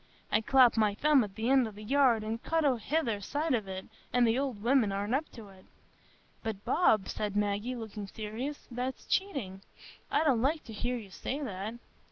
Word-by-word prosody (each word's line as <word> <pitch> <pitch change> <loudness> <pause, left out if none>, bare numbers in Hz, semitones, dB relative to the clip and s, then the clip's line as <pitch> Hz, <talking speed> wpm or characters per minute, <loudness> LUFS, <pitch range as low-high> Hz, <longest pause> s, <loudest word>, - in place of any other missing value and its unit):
I 215 - +3
clap 250 0 +5
my 210 -2 +3
thumb 290 +1 +4
at 200 -2 -7
the 225 +1 -2
end 260 -2 +4
o' - - -5
the 210 0 -11
yard 250 -2 +3
and 225 +2 -3
cut 325 -1 0
o' 275 - +5
the 240 - -5
hither 240 -7 0
side 295 +8 -1
of 220 -5 0
it, 190 0 -6 0.3
and 245 0 +4
the 225 0 +3
old 255 -7 -3
women 240 -4 +3
aren't 200 +3 -2
up 295 +4 -1
to't." 195 -5 -13 0.7
"But 215 -3 -5
Bob," 220 - +3
said 210 -1 -3
Maggie, 205 +4 0
looking 220 -3 -6
serious, 225 +8 -6
"that's 250 +2 -4
cheating; 265 - -1 0.5
I - - +2
don't 265 -7 +3
like 300 +5 +1
to 225 - -10
hear 245 +4 -2
you 205 -5 -10
say 265 +8 -4
that." 210 -1 -4
230 Hz, 205 wpm, -31 LUFS, 210-270 Hz, 0.7 s, clap